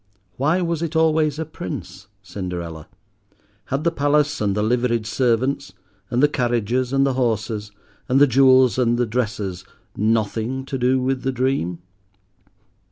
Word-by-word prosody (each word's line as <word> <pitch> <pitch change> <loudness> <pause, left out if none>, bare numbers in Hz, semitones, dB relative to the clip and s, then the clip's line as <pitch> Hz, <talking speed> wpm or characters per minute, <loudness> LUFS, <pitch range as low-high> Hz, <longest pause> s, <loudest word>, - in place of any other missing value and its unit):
Why 155 +7 +1
was 170 -2 -2
it 165 -1 -3
always 155 -2 +2
a 160 - -3
prince, 95 - -7 0.2
Cinderella? 85 -5 -6 0.8
Had 135 +3 -2
the 170 - +2
palace 145 -2 +1
and 100 -2 +1
the 105 - 0
liveried 120 0 +1
servants, 120 -2 0 0.4
and 125 +3 +1
the - - +7
carriages 120 -2 0
and 135 0 +3
horses, 110 -5 -1 0.4
and 130 +2 +4
the 145 - +8
jewels 130 -1 +5
and 120 -1 +2
the 120 - +1
dresses, 105 -5 -3 0.3
nothing 110 +4 -1
to 135 -1 -4
do 130 +1 +2
with 130 0 -1
the 135 - -1
dream? 125 -10 -1
125 Hz, 145 wpm, -21 LUFS, 110-135 Hz, 0.8 s, the